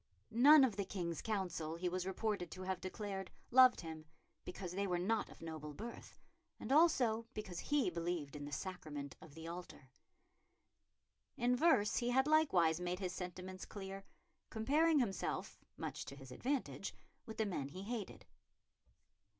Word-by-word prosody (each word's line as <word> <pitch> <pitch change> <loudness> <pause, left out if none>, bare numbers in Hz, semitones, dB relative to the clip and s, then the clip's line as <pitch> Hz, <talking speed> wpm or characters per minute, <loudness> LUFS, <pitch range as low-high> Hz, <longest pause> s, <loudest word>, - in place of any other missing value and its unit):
None 275 +6 +8
of 230 -7 +2
the 200 - +1
King's 175 -4 -3
Council, 175 -7 -2
he 175 +2 -2
was 185 +1 -2
reported 190 -2 -1
to 185 +3 -7
have 190 0 -2
declared, 195 0 -4 0.2
loved 255 0 +7
him, 160 -2 -7 0.4
because 180 -1 -6
they 200 +2 -1
were 180 -1 +1
not 210 +5 0
of - - -13
noble 155 -2 -6
birth, 230 +6 -8 0.4
and - - -5
also 250 -8 +4
because 190 -5 -5
he 290 -10 +1
believed 170 -4 -3
in 145 -1 -5
the 145 - -7
Sacrament 150 -4 -5
of 150 -2 -13
the 165 0 -8
Altar. 170 -6 -8 1.5
In 250 -1 +3
verse 250 -8 +4
he 240 -1 +1
had 265 +2 +4
likewise 190 - +4
made 180 0 -2
his 185 -2 -3
sentiments 185 0 -6
clear, 195 -1 -7 0.5
comparing 300 +8 +3
himself, 210 - -1 0.2
much - - -4
to 140 - -8
his 135 -2 -11
advantage, 260 - -2 0.3
with 220 - -7
the 220 - +1
men 170 -9 -2
he 185 +6 -7
hated. 220 -2 -5
190 Hz, 160 wpm, -38 LUFS, 170-230 Hz, 1.5 s, None